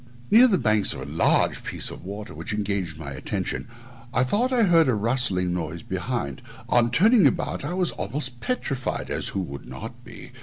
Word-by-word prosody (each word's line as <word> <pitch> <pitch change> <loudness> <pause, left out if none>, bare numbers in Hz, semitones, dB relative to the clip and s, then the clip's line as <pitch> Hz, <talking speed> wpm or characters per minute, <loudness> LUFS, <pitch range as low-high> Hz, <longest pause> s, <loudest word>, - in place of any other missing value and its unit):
Near 235 +4 +8
the 200 -6 +3
banks 110 - +3
of - - -7
a - - -5
large 80 - +2
piece - - -3
of - - -10
water, 100 +3 -7
which - - -8
had 105 - -1
engaged 100 -6 -2
my 75 -3 -7
attention, 70 - -4 0.4
I 125 - +2
thought 225 - +1
I 245 -3 +3
heard 165 -5 +5
a 125 - +3
rustling 105 -5 0
noise 85 -1 -4
behind; 95 - -3 0.3
on 120 -1 +4
turning 205 - +5
about 130 - -1
I 175 - -3
was 185 -2 +2
almost 130 -3 -5
petrified 135 - -2
(as - - 0
who 100 - -2
would 70 -6 -7
not - - -9
be?) - - -11
115 Hz, 195 wpm, -25 LUFS, -, 0.4 s, Near